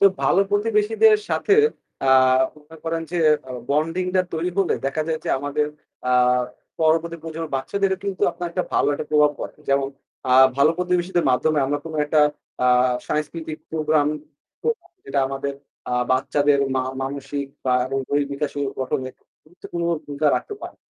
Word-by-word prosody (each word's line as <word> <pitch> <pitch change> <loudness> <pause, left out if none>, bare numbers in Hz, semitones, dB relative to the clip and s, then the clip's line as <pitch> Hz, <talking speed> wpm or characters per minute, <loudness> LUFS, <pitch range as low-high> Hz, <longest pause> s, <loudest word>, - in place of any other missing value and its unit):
তো - - +5 0.2
ভালো 190 - +4
প্রতিবেশীদের 215 - +4
সাথে 405 - +2 0.5
অ্যাঁ 130 -1 +5
বলতে 150 +1 -16
পারেন 165 0 -1
যে 175 - 0 0.3
আ - - -9 0.2
বন্ডিং 165 +5 +1
টা 185 - +4
তৈরি 165 +3 -1
হলে 195 -3 +2
দেখা 145 +3 -1
যায় 160 -1 0
যে - - -4
আমাদের 145 +2 -1 0.4
অ্যাঁ 125 0 +3 0.4
পরবর্তী 165 +1 +2
প্রজন্মের 160 -2 -5
বাচ্চাদেরও 190 +8 -1
কিন্তু 195 -2 -3
আপনার 175 - -5
একটা 180 +1 -1
ভালো - - +3
একটা 145 - -4
প্রভাব 150 -1 +5
পড়ে। - - -6
যেমন 140 0 +2 0.4
অ্যাঁ 130 +1 +7
ভালো 140 +3 +5
প্রতিবেশীদের 180 -1 0
মাধ্যমে 150 +5 +2
আমরা 145 +2 0
কোন 160 - -7
একটা 150 +1 +3 0.4
অ্যাঁ 125 0 +4 0.2
সাংস্কৃতিক 155 +1 -3
প্রোগ্রাম 155 -2 +2 0.6
করতে 465 - +2
পারি। - - -27
যেটা 135 0 0
আমাদের 135 +1 -3 0.3
অ্যাঁ 125 0 0
বাচ্চাদের 140 +2 +2 0.2
মা 130 - +1 0.2
মানসিক 140 +1 -4 0.2
বা 130 -1 +2
এবং 135 +1 -2
দৈহিক 145 0 +1
বিকাশ 140 +1 -2
ও - - 0 0.2
গঠনে 130 0 -2 0.3
গুরুত্বপূর্ণ 170 +1 -7 0.2
ভূমিকা 145 +1 -2
রাখতে 415 - -5
পারে। - - -8
150 Hz, 165 wpm, -22 LUFS, 135-170 Hz, 0.6 s, অ্যাঁ